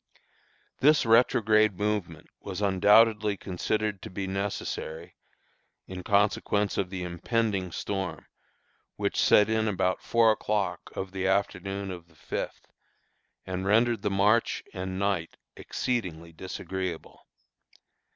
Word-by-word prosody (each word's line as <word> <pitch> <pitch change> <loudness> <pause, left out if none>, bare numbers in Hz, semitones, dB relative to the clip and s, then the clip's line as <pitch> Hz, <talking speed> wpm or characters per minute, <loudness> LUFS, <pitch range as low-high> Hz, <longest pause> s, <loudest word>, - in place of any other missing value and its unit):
This 150 0 +4
retrograde 110 -3 +4
movement 105 -6 -2
was 95 -1 -6
undoubtedly 105 +1 +4
considered 105 +2 -2
to - - -8
be 95 +1 -4
necessary 95 -4 -4 0.7
in 95 -1 -7
consequence 100 +1 +1
of 95 -2 -1
the 95 -1 -5
impending 95 +2 -1
storm, 95 0 -4 0.7
which - - -1
set 105 - +5
in 110 0 +1
about 95 -2 0
four 115 -1 +4
o'clock 105 -1 -2
of 95 -1 -4
the 95 0 -2
afternoon 95 0 -1
of 85 -2 -9
the 85 - -25
fifth, 75 - -5 0.8
and 95 +1 -3
rendered 115 +1 +3
the - - 0
march 105 +4 +2
and 95 -1 -4
night 100 -4 -1 0.2
exceedingly 90 -10 -3
disagreeable. 95 0 -6
100 Hz, 115 wpm, -28 LUFS, 95-105 Hz, 0.8 s, set